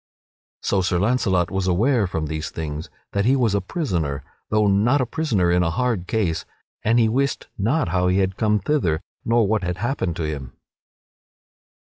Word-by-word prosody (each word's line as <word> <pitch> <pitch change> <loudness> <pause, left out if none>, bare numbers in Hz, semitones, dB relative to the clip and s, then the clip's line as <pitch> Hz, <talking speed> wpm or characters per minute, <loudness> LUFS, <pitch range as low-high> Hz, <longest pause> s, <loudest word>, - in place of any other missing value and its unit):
So 100 - +1
Sir 90 0 +1
Launcelot 95 -4 +1
was 95 -1 -1
aware 110 +4 +2
from 80 -3 -2
these 80 +1 -4
things 75 -1 -5 0.2
that 100 0 0
he 130 +3 +4
was 120 -6 +2
a 100 - +1
prisoner 85 - -2 0.3
though 110 0 +3
not 105 +8 +3
a 130 - +1
prisoner 110 - 0
in 90 0 +3
a 85 - +2
hard 105 0 -1
case 85 -8 0 0.4
and 115 +2 +3
he 115 -2 +5
wist 135 +5 0
not 115 - +1
how 90 +1 +1
he 90 +1 +2
had 95 -1 +1
come 105 -1 +2
thither 95 - 0 0.2
nor 115 -1 +3
what 105 +1 +1
had 90 -1 -2
happened 95 - -1
to 85 - -3
him. 70 -5 -4
100 Hz, 180 wpm, -22 LUFS, 85-115 Hz, 0.4 s, he